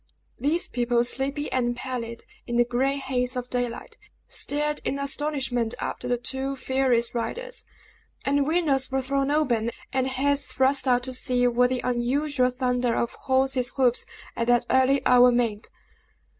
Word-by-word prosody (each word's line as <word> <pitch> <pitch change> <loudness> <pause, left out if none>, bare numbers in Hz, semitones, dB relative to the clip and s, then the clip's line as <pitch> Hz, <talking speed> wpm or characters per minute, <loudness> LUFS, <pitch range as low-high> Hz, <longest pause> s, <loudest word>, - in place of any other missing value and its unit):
These 300 +7 +1
people, 240 -1 +1
sleepy 275 +4 -1
and 240 -2 0
pallid 240 -2 -5 0.2
in 240 - -3
the 240 0 +4
gray 255 +3 0
haze 255 -2 -1
of 250 0 -5
daylight, 245 -2 -3 0.3
stared 295 +1 0
in 275 - -1
astonishment 280 -5 -1
after 250 - -4
the 245 0 +1
two 265 +3 -3
furious 260 -3 +1
riders; - - -4 0.6
and 280 0 +2
windows 305 -5 +1
were 265 0 -1
thrown 275 +1 0
open, 255 -7 +1 0.2
and 260 0 +1
heads 280 +2 0
thrust 265 +1 +2
out 245 -1 +3
to 260 0 -5
see 250 -1 +1
what 245 +1 +3
the 255 -1 -1
unusual 250 +2 +1
thunder 250 -1 0
of 235 - -1
horses' 260 -1 +1
hoofs 250 -3 +2 0.3
at 230 - -2
that 245 0 +3
early 260 +1 +3
hour 250 0 +6
meant. 230 -3 -1
255 Hz, 155 wpm, -25 LUFS, 245-275 Hz, 0.6 s, hour